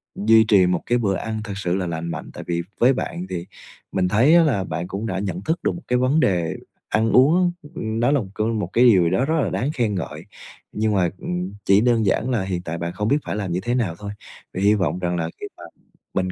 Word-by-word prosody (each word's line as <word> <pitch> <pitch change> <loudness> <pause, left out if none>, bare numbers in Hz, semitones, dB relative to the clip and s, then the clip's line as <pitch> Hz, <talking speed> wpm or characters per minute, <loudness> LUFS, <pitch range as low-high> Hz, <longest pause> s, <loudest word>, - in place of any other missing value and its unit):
duy 110 +2 +5
trì 100 -4 +5
một 90 -1 0
cái 120 - +2
bữa 100 -5 0
ăn 110 +1 -4
thật 100 -3 -6
sự 90 -2 -1
là 90 -2 -2
lành 85 0 -4
mạnh. 80 - -7
Tại - - -8
vì 85 0 -1 0.2
với 130 +3 +5
bạn 90 -7 -4
thì 90 -1 -4 0.5
mình 90 -1 +1
thấy 125 - +4
á 170 - +7
là 120 -11 +1
bạn 90 0 -4
cũng 100 +3 -4
đã 95 -2 -2
nhận 95 -2 -3
thức 160 - -1
được - - +2
một 175 - -8
cái 125 - +2
vấn 135 +5 +2
đề 85 - +1 0.3
ăn 110 +1 +1
uống, 170 +7 +5
ơ, 145 - -13
nó 115 +4 0
là 145 - +3
một 95 - -7
cơ 110 - -1
một 110 -2 -1
cái 125 +2 +5
điều 95 -7 +6
gì 85 - +2
đó 120 +9 +1
rất 160 0 +1
là - - 0
đáng 140 +5 -1
khen 110 -5 0
ngợi, 90 - -5 0.5
nhưng 110 0 0
mà, 90 -3 +2
ừm, 90 +2 -4
chỉ 100 +2 +5
đơn 115 -3 +2
giản 115 +6 +1
là 115 -7 0
hiện 90 -2 -3
tại 85 -1 -5
bạn 85 +1 -4
không 105 +3 -2
biết 140 +4 +3
phải - - -3
làm 100 -4 -3
như 90 - 0
thế 120 +1 0
nào 100 -10 -1
thôi. 100 -1 -6 0.4
Vậy 95 - -3
hy 105 +1 +5
vọng 95 -3 0
rằng 90 -1 -1
là 80 -1 -2
khi - - -5
mà - - -12 0.5
mình 95 -1 -1
100 Hz, 270 wpm, -22 LUFS, 90-120 Hz, 0.5 s, á